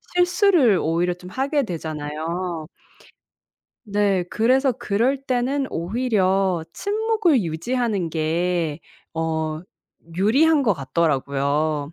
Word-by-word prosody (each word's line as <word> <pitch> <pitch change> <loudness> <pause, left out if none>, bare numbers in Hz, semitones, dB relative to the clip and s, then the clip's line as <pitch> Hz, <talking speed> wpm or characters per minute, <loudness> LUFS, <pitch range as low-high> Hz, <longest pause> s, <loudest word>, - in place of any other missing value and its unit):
실수를 355 - +4
오히려 170 +2 +1
좀 180 0 -12
하게 275 +5 0
되잖아요. 160 0 -4 1.2
네. 200 -3 +1
그래서 255 +8 +2
그럴 245 +5 0
때는 265 +2 0
오히려 190 -2 0
침묵을 415 - +1
유지하는 195 +2 -2
게 165 0 -1 0.3
어 160 -1 -2 0.6
유리한 280 - +4
것 225 -6 +3
같더라고요, 145 0 -1
185 Hz, 210 characters per minute, -22 LUFS, 160-255 Hz, 1.2 s, 실수를